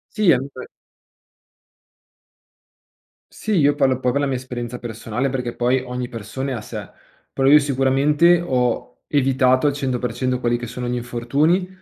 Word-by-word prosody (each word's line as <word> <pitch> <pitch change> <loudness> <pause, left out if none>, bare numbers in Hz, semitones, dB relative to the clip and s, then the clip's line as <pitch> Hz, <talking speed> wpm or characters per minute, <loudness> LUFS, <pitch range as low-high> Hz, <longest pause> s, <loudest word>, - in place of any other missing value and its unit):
Sì 210 -4 +3
è, 125 - +6
mhmm, 135 - -4
b - - -8 2.7
Sì, 220 - -4
io 145 -1 +4
parlo 135 -3 +1
poi 125 -1 +1
per 140 - 0
la 145 - +1
mia 135 - -1
esperienza 125 -1 -6
personale, 120 +2 -3
perché 125 -2 -3
poi 125 +2 +2
ogni 125 -1 -5
persona 130 +4 -5
è - - -1
a 115 - -4
sé, - - -7 0.4
però 135 0 0
io 150 +2 +8
sicuramente 145 +5 +3
ho 125 -1 -1
evitato 130 -2 +2
al 145 - +1
100% 125 -2 -2
quelli 120 -1 +1
che 120 - -6
sono 125 +2 -5
gli 120 - -2
infortuni, 135 +10 0
130 Hz, 165 wpm, -21 LUFS, 125-140 Hz, 2.7 s, io